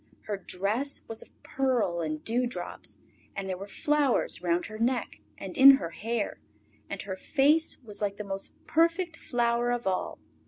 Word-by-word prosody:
Her 210 - -3
dress 205 +9 -2
was 225 - -5
of - - -17
pearl 245 -10 0
and 155 -1 -3
dew 245 +2 +1
drops, 245 - -6 0.4
and 195 -1 -4
there 190 - -2
were 195 +2 -8
flowers 290 - +1
round 175 0 +1
her 215 0 -8
neck 240 -1 0 0.2
and 190 -2 -7
in 275 +1 +10
her 170 -6 -5
hair, 225 +5 -3 0.5
and - - -4
her 190 -1 -4
face 295 +10 +2
was 210 -3 -6
like 200 -1 -1
the 210 - -4
most 195 -1 -4
perfect 335 +1 +2
flower 240 -3 0
of 245 -1 -1
all. 190 -1 -1
225 Hz, 170 wpm, -29 LUFS, 195-265 Hz, 0.5 s, in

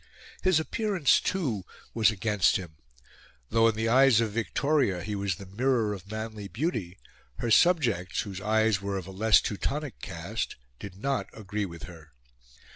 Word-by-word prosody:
His 185 -4 +3
appearance, 190 -2 +2
too, 130 - -2 0.3
was 110 -3 +4
against 105 -2 +2
him. 85 -4 -4 0.8
Though 115 0 +4
in 115 - +1
the 110 +1 -1
eyes 130 0 +5
of 115 -2 0
Victoria 115 - 0
he 105 +1 -4
was 100 -3 -1
the 100 - -10
mirror 115 +2 0
of 100 -1 -10
manly 110 -1 -5
beauty, 110 - -3 0.4
her 115 - -3
subjects, 115 - +3
whose 95 -2 -7
eyes 110 -2 +2
were 100 0 -2
of 95 - -5
a 95 - -9
less 110 +3 +4
Teutonic 140 +7 -3
cast, 85 +7 -4 0.2
did 100 -2 -8
not 130 -3 -1
agree 105 -1 -4
with 85 -2 -11
her. 80 -5 -12
110 Hz, 160 wpm, -28 LUFS, 95-120 Hz, 0.8 s, eyes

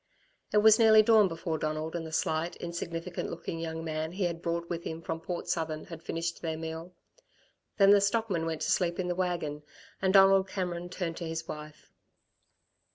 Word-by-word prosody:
It - - +2
was 220 0 +7
nearly 220 -1 +7
dawn 215 -2 +6
before 165 -2 -3
Donald 155 +2 -3
and 165 -1 -3
the - - -9
slight, 160 +2 -1
insignificant 170 0 -5
looking 165 - -5
young 165 0 -4
man 160 0 -3
he 195 +1 -2
had 170 -1 -2
brought 170 0 -2
with 170 -1 -4
him 160 - -5
from 165 - -4
Port 175 +1 -5
Southern 160 -2 -2
had 165 -2 -9
finished 165 +1 -3
their 160 -2 -3
meal. 160 +2 -6 0.8
Then 195 -1 +7
the 205 -1 +6
stockman 200 -5 0
went 160 -1 -3
to - - 0
sleep 175 -2 +1
in 180 -1 -2
the - - +1
wagon, 175 -5 -2 0.4
and 190 0 +2
Donald 195 0 +6
Cameron 175 -2 -3
turned 175 -2 -4
to 170 - -4
his 165 0 -4
wife. 150 0 -9
170 Hz, 190 wpm, -30 LUFS, 160-185 Hz, 0.8 s, was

